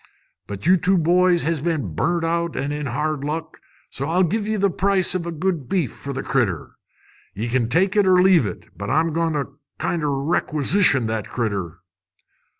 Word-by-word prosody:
But 100 Hz, -1 st, -7 dB
you 185 Hz, +2 st, +5 dB
two 185 Hz, +3 st, +2 dB
boys 175 Hz, +1 st, +3 dB
has 160 Hz, -2 st, -1 dB
been 150 Hz, -, -2 dB
burnt 170 Hz, -, 0 dB
out 170 Hz, 0 st, -1 dB
an' 140 Hz, +2 st, -2 dB
in 150 Hz, -1 st, -3 dB
hard 150 Hz, +3 st, -2 dB
luck, 160 Hz, +2 st, -5 dB, 0.3 s
so 140 Hz, -, -3 dB
I'll 175 Hz, +4 st, +2 dB
give 210 Hz, +5 st, -1 dB
ye 220 Hz, -, 0 dB
the 200 Hz, -2 st, +1 dB
price 190 Hz, -1 st, +1 dB
o' 185 Hz, -, 0 dB
good 170 Hz, -4 st, -3 dB
beef 170 Hz, -, 0 dB
for 140 Hz, -, -7 dB
the 135 Hz, -, -4 dB
critter. 105 Hz, -, -1 dB, 0.6 s
Ye 110 Hz, +4 st, -3 dB
kin 120 Hz, -1 st, 0 dB
take 185 Hz, -, +2 dB
it 205 Hz, -2 st, +3 dB
or 185 Hz, -1 st, +5 dB
leave 180 Hz, -, +5 dB
it. -, -, -8 dB
But -, -, -6 dB
I'm 160 Hz, 0 st, +1 dB
going 165 Hz, 0 st, 0 dB
to 140 Hz, -1 st, -4 dB, 0.2 s
kinder 150 Hz, -4 st, -1 dB
requisition 150 Hz, -, +2 dB
the 110 Hz, 0 st, -1 dB
critter." 100 Hz, -6 st, -4 dB
160 Hz, 185 wpm, -22 LUFS, 135-180 Hz, 0.6 s, you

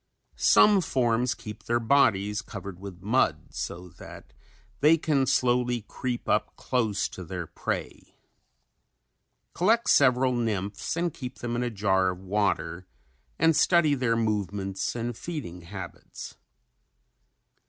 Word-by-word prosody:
Some 205 Hz, -2 st, +5 dB
forms 125 Hz, -5 st, +1 dB
keep 105 Hz, -1 st, -10 dB
their 120 Hz, 0 st, +1 dB
bodies 110 Hz, -5 st, +2 dB
covered 95 Hz, -3 st, -8 dB
with 95 Hz, -2 st, -10 dB
mud 100 Hz, -, +1 dB
so 90 Hz, +1 st, -5 dB
that -, -, -12 dB, 0.5 s
they 155 Hz, +3 st, +5 dB
can 145 Hz, -4 st, +1 dB
slowly 120 Hz, -2 st, +1 dB
creep 125 Hz, -2 st, -4 dB
up -, -, 0 dB
close 110 Hz, -5 st, 0 dB
to 95 Hz, -, -8 dB
their 85 Hz, 0 st, -5 dB
prey. -, -, -5 dB, 1.4 s
Collect 225 Hz, +6 st, +2 dB
several 130 Hz, -1 st, +4 dB
nymphs 110 Hz, -, -2 dB
and 170 Hz, -2 st, 0 dB
keep 125 Hz, -1 st, -7 dB
them 120 Hz, 0 st, -4 dB
in 120 Hz, -, -1 dB
a 125 Hz, -, 0 dB
jar 95 Hz, -3 st, +1 dB
of 90 Hz, -, -4 dB
water 95 Hz, -3 st, -1 dB, 0.5 s
and 165 Hz, -1 st, +4 dB
study 155 Hz, -1 st, +4 dB
their 125 Hz, -4 st, +1 dB
movements 100 Hz, -3 st, -2 dB
and 120 Hz, 0 st, -3 dB
feeding 130 Hz, -, -6 dB
habits. 95 Hz, +3 st, -9 dB
115 Hz, 125 wpm, -27 LUFS, 95-130 Hz, 1.4 s, Some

